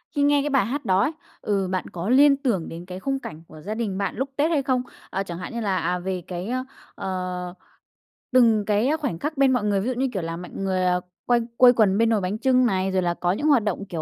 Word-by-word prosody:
khi 285 - +1
nghe 285 0 +4
cái 295 - -1
bài 270 -7 +2
hát 280 +5 -4
đó 190 +1 +3
ấy, 290 - +1 0.3
ừ, 195 -3 0
bạn 185 - -2
có 180 +5 -4
liên 275 +2 +6
tưởng 230 - -1
đến 170 +2 -8
cái 185 0 -7
khung 270 +4 -2
cảnh 155 -6 -9
của 155 -1 -13
gia 210 +5 -4
đình 210 -5 -2
bạn 200 - -2
lúc 270 +1 -2
Tết 310 +4 +1
hay 285 -4 +1
không? 255 -2 +1 0.3
Ờ, 195 +2 -2
chẳng 170 -3 -7
hạn 180 +6 -7
như 235 - -3
là, 195 -3 0
à, 180 +2 -1
về 185 0 -3
cái, 180 +2 -5
ơ, 255 +1 -1 0.3
ờ, 180 -1 -4 0.8
từng 225 -5 +4
cái 215 +5 +2
khoảnh 260 - -3
khắc 300 0 -3
bên 270 -1 +4
mọi 245 -4 +1
người. 200 -2 +1
Ví 225 - -3
dụ 255 - 0
như, 265 +2 0
kiểu, 190 - -2
là 165 0 -4
mạnh 180 0 -9
người, 185 -1 0
ờ, 180 0 +2 0.2
quây 240 -1 +3 0.2
quây 250 -1 +8
quần 205 -4 +3
bên 230 0 +3
nồi 215 -3 +2
bánh 185 +4 -2
chưng 255 0 +3
này, 190 -3 0
rồi 190 0 +1
là 175 -1 0
có 175 +1 -1
những 290 +11 -1
hoạt 270 -8 +4
động, 200 -1 -2
kiểu, 170 -5 -5
205 Hz, 275 wpm, -24 LUFS, 185-255 Hz, 0.8 s, quây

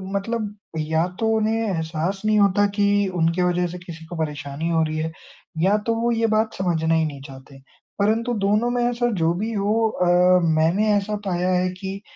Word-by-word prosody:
मतलब 210 +1 -3 0.2
या 160 +1 0
तो 225 - +1
उन्हें 220 +1 +1
एहसास 165 +2 -2
नहीं 215 0 +3
होता 200 0 +4
कि 205 -1 +2
उनके 170 +1 +1
वज़ह 180 0 +1
से 175 +1 -7
किसी 165 -2 -10
को 175 - -8
परेशानी 150 0 -3
हो 165 -1 +2
रही 155 0 -3
है 160 +1 -2 0.5
या 195 +4 +3
तो 230 - +2
वो 235 +1 +1
ये 230 -1 +1
बात 220 0 +1
समझना 165 -3 0
ही 160 0 +2
नहीं 145 -3 -6
चाहते। 135 0 -13 0.4
परंतु 225 +4 +1
दोनों 210 +4 +2
में 245 0 0
ऐसा 240 0 0
जो 165 +1 +3
भी 210 +6 -3
हो 215 +2 +1
अ, 180 -1 +3 0.2
मैंने 170 +7 +2
ऐसा 205 +1 -1
पाया 180 -1 0
है 180 0 +1
कि 195 +1 -5
185 Hz, 195 wpm, -22 LUFS, 160-215 Hz, 0.5 s, होता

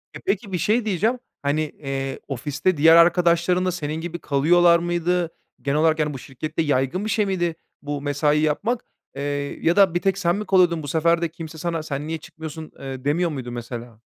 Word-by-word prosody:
E, - - -6
peki, 240 - -1
bir 180 - 0
şey 215 +7 +1
diyeceğim. 220 +5 +1 0.2
Hani, 145 +2 +1
eee, 135 -3 -4
ofiste 145 +6 -1
diğer 160 +3 +7
arkadaşların 175 +1 +4
da 185 - +1
senin 160 -2 -4
gibi 170 0 -5
kalıyorlar 170 +5 +4
mıydı? 175 0 0 0.3
Genel 140 +2 0
olarak 160 0 +3
yani 150 -1 0
bu 135 - -6
şirkette 145 +5 -4
yaygın 145 +5 0
bir 220 - -2
şey 210 0 +2
miydi 175 -4 -1 0.3
bu 145 -1 -4
mesai 145 +1 +1
yapmak? 205 +11 0 0.3
Eee, 140 - -5 0.4
ya 170 - +4
da 195 -4 +5
bir 175 - 0
tek 195 0 +1
sen 175 -2 +1
mi 210 +1 -4
kalıyordun? 175 -4 +3
Bu 145 - -6
sefer 165 +3 +2
de 170 - 0
kimse 165 -1 -9
sana 165 0 -2
"Sen 145 -1 -4
niye 160 0 -2
çıkmıyorsun?" 160 0 -9
eee, 135 -1 -7
demiyor 170 +4 +2
muydu 130 -5 -5
mesela? 120 -1 -7
160 Hz, 200 wpm, -23 LUFS, 145-175 Hz, 0.4 s, diğer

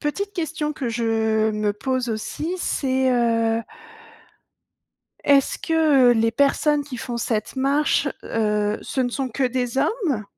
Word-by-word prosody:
petite 400 +7 -3
question 315 -4 -3
que 275 -5 -4
je 220 -1 +1
me 210 -1 -1
pose 255 +3 -2
aussi, 300 +10 -3
c'est, 260 -5 0
heu 230 -2 +2 1.6
est-ce 280 -1 +3
que, 310 -6 +3
heu, - - +6
les 225 0 +1
personnes 285 +3 +2
qui 275 -3 -7
font 240 0 -5
cette 220 -2 -2
marche 280 +2 +2 0.2
heu, 210 -1 0
ce 265 - -3
ne 250 - +1
sont 265 +1 -2
que 260 +3 -1
des 250 0 -1
hommes? 295 - 0
255 Hz, 145 wpm, -22 LUFS, 225-290 Hz, 1.6 s, heu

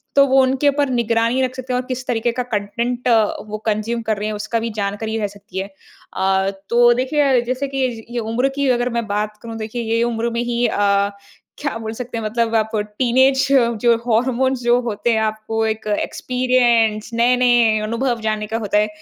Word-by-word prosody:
तो 280 0 +7
वो 265 0 +5
उनके 265 +2 +2
ऊपर 285 0 0
निगरानी 235 0 +1
रख 255 0 -2
सकते 255 -1 -5
हैं 250 - +1
और - - -14
किस 255 0 -4
तरीके 235 0 0
का 250 +1 -2
कंटेंट 235 +2 -3
अ, 225 -3 +5 0.2
वो 215 0 -4
कंज़्यूम 220 +2 -1
कर 220 -2 +1
रहे 210 - -3
हैं, 215 - -2
उसका 215 +2 -2
भी 230 +1 -3
जानकारी 210 +2 -2
रह 210 - 0
सकती 200 -1 -9
है। 190 - -2 0.5
अ, 190 0 +2 0.2
तो 240 0 +5
देखिए, 265 0 +2
जैसे 255 +3 -2
कि 265 -1 +1 0.2
ये 240 0 -3
उम्र 235 +4 0
की 280 -1 0
अगर 245 0 +1
मैं 235 -1 -1
बात 210 +1 -2
करूँ, 230 -1 -7
देखिए 225 +2 -4
ये 230 - +1
उम्र 235 0 -1
में 235 - -1
ही 240 0 0
अ, 200 0 +1 0.5
क्या 285 -5 -3
बोल 220 -1 -5
सकते 235 0 -6
हैं? 225 - -4
मतलब 230 +1 0
आप 220 0 0 0.2
टीनेज 265 +2 +3 0.3
जो 235 -1 +4
हॉर्मोन्स 250 +2 +1
जो 240 +1 +4
होते 230 0 -1
हैं 220 - +2
आपको 220 +1 -1
एक 220 0 -3
एक्सपीरियंस 240 -4 +1
नए-नए 240 -2 +3
अनुभव 230 +2 -1
जानने 215 -1 -2
का 220 +2 -2
होता 210 -2 0
है। 210 - +2
235 Hz, 200 wpm, -19 LUFS, 215-250 Hz, 0.5 s, तो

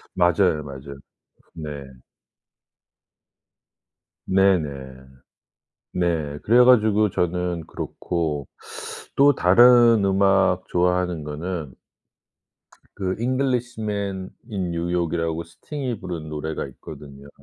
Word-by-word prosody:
맞아요, 90 -3 +2
맞아요. 70 0 -9 0.6
네. 75 -4 -7 2.4
네네. 95 -4 +3 1.3
네. 80 -5 -1
그래 120 +3 +6
가지고 110 -4 +4
저는 90 -2 -2
그렇고. 80 -6 -3 0.7
또 140 0 +5
다른 115 +2 +6
음악 95 -1 +2
좋아하는 90 -2 0
거는 75 -1 -5 1.2
그 95 -2 -1
잉글리시맨 115 -7 -2 0.2
인 95 -6 -3
뉴욕이라고 85 -1 -1
스팅이 125 - -6
부른 85 -4 -6
노래가 75 0 -4
있거든요. 70 +1 -12
90 Hz, 190 characters per minute, -23 LUFS, 80-105 Hz, 2.4 s, 그래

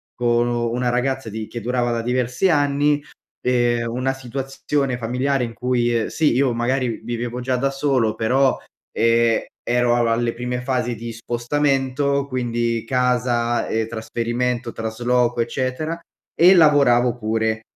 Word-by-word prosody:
con 120 0 +1
nu 120 -1 -1
una 125 0 -1
ragazza 125 0 -1
di 110 0 -5
che 120 - -6
durava 120 +1 0
da 115 -1 -1
diversi 125 +7 0
anni, 145 -1 +2 0.4
ehm, 120 -2 +1
una 130 +2 -1
situazione 135 +1 -3
familiare 125 +3 -1
in 115 - -8
cui, 120 -2 0
sì, 155 -5 +1
io 130 -1 +2
magari 120 0 -1
vivevo 120 +1 -4
già 125 0 0
da 135 +2 +1
solo, 135 -5 +1
però, 130 +4 +2 0.4
ehm, 115 0 +3 0.2
ero 120 0 +2
al 120 -1 +2
alle 115 +1 0
prime 125 +1 -4
fasi 125 -2 -1
di 115 +1 -6
spostamento, 135 +3 0
quindi, 120 -3 -1
casa, 125 -2 +1
e 110 0 -1
trasferimento, 120 +2 -2
trasloco, 120 +2 0
eccetera, 130 +7 -2 0.4
e 180 +3 +7
lavoravo 140 -7 +5
pure. 110 -1 -1
125 Hz, 140 wpm, -21 LUFS, 115-130 Hz, 0.4 s, e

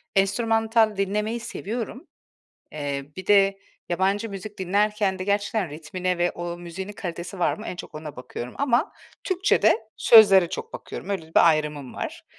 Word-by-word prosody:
enstrümantal 225 +2 +2
dinlemeyi 210 +4 -1
seviyorum. 235 - -5 0.7
Eee, 145 -1 -4
bir 190 0 -7
de 195 -1 +4 0.3
yabancı 195 +5 0
müzik 200 +1 -8
dinlerken 200 +1 +1
de 185 - -4
gerçekten 200 -2 0
ritmine 180 +4 -3
ve 175 0 +2
o 175 0 -5
müziğin 175 +3 -7
kalitesi 180 0 -6
var 175 - +2
mı 215 - -9
en - - -5
çok - - -9
ona 155 -2 -8
bakıyorum 125 -1 -7
ama 260 -3 +1 0.3
Türkçede 375 - +3 0.2
sözlere 195 -6 +7
çok 455 - -6
bakıyorum. - - -8
Öyle 195 -4 -1
bir - - +7
ayrımım 150 -4 -1
var. - - -6
195 Hz, 150 wpm, -24 LUFS, 175-215 Hz, 0.7 s, sözlere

